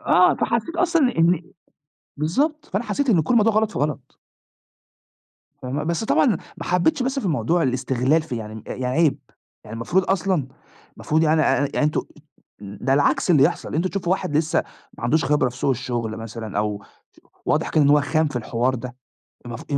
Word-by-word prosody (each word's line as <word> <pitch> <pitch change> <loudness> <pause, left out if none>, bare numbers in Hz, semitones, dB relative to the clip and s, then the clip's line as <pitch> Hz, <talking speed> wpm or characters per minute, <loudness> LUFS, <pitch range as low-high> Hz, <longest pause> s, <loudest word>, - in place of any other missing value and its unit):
آه، - - +4
فحسيت 335 +1 -1
أصلًا 340 -2 +2
إني 250 -6 +1
إني 170 0 +2 0.7
بالضبط، 280 - 0
فأنا 200 +5 -3
حسيت 285 +2 -1
إن 175 -8 +4
كل 160 - -1
الموضوع 225 -1 +4
غلط 215 0 +2
في - - -4
غلط. 145 -3 -3 1.4
فاهمة، 130 +4 -3
بس 170 +6 -1
طبعًا - - +3 0.3
ما - - -7
حبيتش 175 +5 +1
بس 265 +2 -1
في - - -4
الموضوع 165 +2 +1
الاستغلال 130 +3 +1
في 130 -6 -5
يعني 110 -1 -7
م 110 - -9
يعني 130 - -5
عيب، 155 +3 +2 0.5
يعني 110 - -9
المفروض 170 +13 0
أصلًا 185 -8 0 0.5
المفروض 155 +1 0
يعني 155 0 +3
أ - - +2 0.2
أ 140 - -1
يعني - - +1
أنتم 150 - 0 0.6
ده 105 +6 -2
العكس 145 +5 +2
اللي 150 -6 +5
يحصل، 165 +5 0
أنتم 170 +4 +1
تشوفوا 185 -3 -1
واحد 150 -5 -1
لسه 155 0 +1 0.4
ما - - -6
عندوش 150 +6 +2
خبرة 145 -2 +2
في 125 - -11
سوق 130 - 0
الشغل 120 -3 -3
مثلًا 115 -2 -6
أو 105 -1 -2 0.6
واضح - - +1
كان 155 - +3
إن 140 - +3
هو 145 0 +5
خام 155 +2 +1
في 145 - -8
الحوار 120 +2 -1
ده، 125 0 -7 0.5
المف 120 -2 -7
150 Hz, 190 wpm, -22 LUFS, 125-180 Hz, 1.4 s, اللي